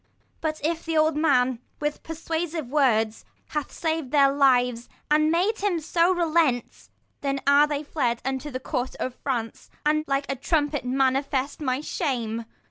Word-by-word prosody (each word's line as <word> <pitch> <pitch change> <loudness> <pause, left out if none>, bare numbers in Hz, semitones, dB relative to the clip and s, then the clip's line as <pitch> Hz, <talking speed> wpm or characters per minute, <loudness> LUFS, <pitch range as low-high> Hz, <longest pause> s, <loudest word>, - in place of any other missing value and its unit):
But 310 -1 -2
if 330 +1 -1
the 325 -1 -1
old 310 0 +3
men, 255 -5 +2 0.2
with 295 0 -2
persuasive 325 -3 -4
words, 225 -7 +2 0.3
Have 300 -1 -3
sav'd 320 -4 -2
their 275 -1 +5
lives, 250 -4 +2 0.2
and 305 +1 +4
made 370 +7 +1
him 390 -4 0
to 335 +2 +1
relent; 320 -7 0 0.3
10 275 -1 0
Then - - -3
are 285 +1 +6
they 295 0 -2
fled 250 -6 -1
unto 270 +2 -2
the 255 -2 -4
court 255 0 -3
of 255 - -3
France, 240 -4 -4 0.2
And 305 0 +2
like 275 0 0
a 275 - -2
trumpet 290 +1 0
manifest 270 +2 0
my 260 -1 0
shame. 235 -8 -2
285 Hz, 160 wpm, -25 LUFS, 255-315 Hz, 0.3 s, are